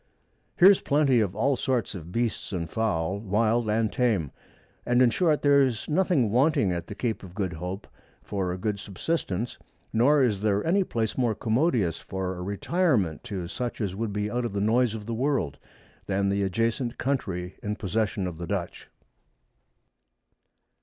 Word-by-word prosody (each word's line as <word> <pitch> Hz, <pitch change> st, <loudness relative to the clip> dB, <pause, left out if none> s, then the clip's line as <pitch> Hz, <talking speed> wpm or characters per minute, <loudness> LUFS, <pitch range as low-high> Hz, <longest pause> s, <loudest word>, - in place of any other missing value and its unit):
Here's 190 Hz, +2 st, +7 dB
plenty 140 Hz, -4 st, +3 dB
of 100 Hz, -4 st, 0 dB
all 135 Hz, +6 st, +2 dB
sorts 125 Hz, -2 st, -1 dB
of 85 Hz, -3 st, -8 dB
Beasts 115 Hz, +2 st, -2 dB
and 85 Hz, -4 st, -3 dB
Fowl, 100 Hz, -2 st, -1 dB
wild 110 Hz, +2 st, +1 dB
and 110 Hz, 0 st, +1 dB
tame; 105 Hz, -, +1 dB, 0.5 s
and 120 Hz, 0 st, +2 dB
in 125 Hz, -2 st, +5 dB
short, 155 Hz, +1 st, +2 dB
there's 140 Hz, -5 st, +3 dB
nothing 155 Hz, -, +2 dB
wanting 135 Hz, -, +3 dB
at 85 Hz, -1 st, -3 dB
the 100 Hz, -, -7 dB
Cape 115 Hz, +1 st, -2 dB
of 95 Hz, -2 st, -12 dB
Good 95 Hz, -4 st, -2 dB
Hope, 90 Hz, +4 st, -5 dB, 0.4 s
for 95 Hz, -3 st, -2 dB
a 90 Hz, -, -3 dB
good 105 Hz, +1 st, -2 dB
Subsistence; 105 Hz, -, -3 dB, 0.3 s
nor 140 Hz, +5 st, +4 dB
is 105 Hz, -6 st, +1 dB
there 105 Hz, -1 st, +1 dB
any 190 Hz, +4 st, +3 dB
Place 115 Hz, -7 st, -2 dB
more 120 Hz, -4 st, +2 dB
commodious 115 Hz, -, +1 dB
for 95 Hz, -1 st, -4 dB
a 90 Hz, -, -7 dB
Retirement 100 Hz, -, 0 dB
to 95 Hz, -5 st, -4 dB
such 120 Hz, +6 st, -4 dB
as 100 Hz, -4 st, -2 dB
would 110 Hz, +1 st, -2 dB
be 105 Hz, +1 st, -2 dB
out 125 Hz, +1 st, -1 dB
of 115 Hz, -4 st, -3 dB
the 100 Hz, -, -1 dB
Noise 115 Hz, +2 st, +2 dB
of 105 Hz, -2 st, -7 dB
the 115 Hz, -, -3 dB
World, 115 Hz, -, -1 dB, 0.5 s
than 100 Hz, 0 st, +1 dB
the 100 Hz, +1 st, 0 dB
adjacent 115 Hz, +5 st, -1 dB
Country 95 Hz, -10 st, -2 dB
in 105 Hz, 0 st, -2 dB
possession 105 Hz, -1 st, -1 dB
of 85 Hz, -2 st, -5 dB
the 85 Hz, -, -5 dB
Dutch. 90 Hz, -3 st, -4 dB
110 Hz, 170 wpm, -27 LUFS, 95-125 Hz, 0.5 s, Here's